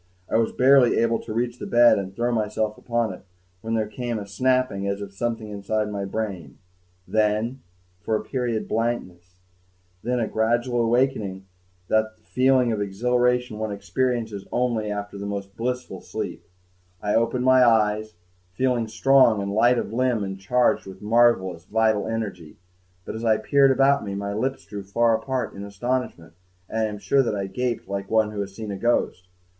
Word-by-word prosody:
I - - +1
was 115 -1 +1
barely 130 -1 +5
able 115 0 +2
to - - -8
reach 120 +2 -2
the - - -5
bed 120 -3 +5
and 95 0 -6
throw 120 +2 0
myself 110 -1 -1
upon 115 -4 -1
it - - -11 0.4
when 115 0 -2
there 110 -1 +1
came 120 +1 -4
a 105 - -5
snapping 125 -1 0
as 100 0 -2
of 100 -1 -7
something 110 0 -3
inside 105 +1 -2
my 100 -1 -3
brain... 95 - -5 0.5
then, 110 +4 0 0.4
for 110 +3 -1
a - - -2
period, 120 -4 -2
blankness... 90 -6 -3 0.7
then 125 +3 -1
a 115 - 0
gradual 120 +2 +1
awakening 115 -4 +1
with 95 +1 -12 0.5
that 110 0 +1
feeling 130 +1 +2
of 105 -2 -1
exhilaration 125 +3 0
one 110 -1 -2
experiences 110 +1 -2
only 120 -4 0
after 100 -1 -5
the 100 - -5
most 100 -1 -5
blissful 125 +2 -4
sleep. - - -5 0.6
I 105 +1 -1
opened 115 +2 +1
my 130 0 +6
eyes, 110 -2 +2 0.4
feeling 125 -1 +1
strong 115 0 +4
and 100 0 -3
light 120 +3 +4
of 110 - -3
limb 125 -3 +1
and 95 -1 -5
charged 120 +2 +1
with 95 0 -10
a - - -9
marvelous 105 -7 +3
vital 110 0 +1
energy 105 -8 -5 0.5
but, - - -5
as 110 - -6
I 110 -2 +3
peered 135 +5 +4
about 135 +1 +3
me, 100 -1 -4
my 100 0 -3
lips 130 +6 -2
drew 100 -1 -7
far 115 +4 +2
apart 130 +3 -3
in 100 - -8
astonishment, 100 -5 -3 0.3
and 110 - -3
I 110 - +2
am 105 -1 -4
sure 135 +6 +2
that 115 -5 -1
I 100 -1 -2
gaped 120 +4 -3
like 100 0 -4
one 110 -1 +2
who 105 -1 -3
has 100 -1 -6
seen 110 -1 -6
a 100 - -4
ghost. 95 -5 0
110 Hz, 180 wpm, -24 LUFS, 100-120 Hz, 0.7 s, my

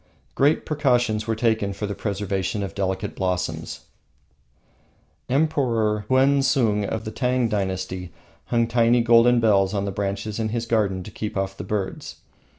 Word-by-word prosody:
Great 145 +3 +2
precautions 125 -7 +1
were 110 - 0
taken 110 -3 0
for 105 - -4
the 100 - -3
preservation 100 -1 -2
of 95 - -5
delicate 95 +1 -2
blossoms. 90 -4 -3 1.5
Emperor 120 -7 +1
Huensung, 130 -5 +3
of 110 +2 -3
the 110 - -4
Tang 125 -1 0
Dynasty, 95 -3 -3 0.3
hung 115 -1 +1
tiny 115 +1 +3
golden 120 +1 +5
bells 100 -3 +3
on 100 0 -1
the 100 - -2
branches 100 +2 -3
in 110 -1 -1
his 115 +1 -2
garden 105 -5 0
to 105 - -10
keep 105 0 -5
off 95 0 -2
the 90 - -7
birds. 95 0 -4
110 Hz, 150 wpm, -23 LUFS, 100-120 Hz, 1.5 s, golden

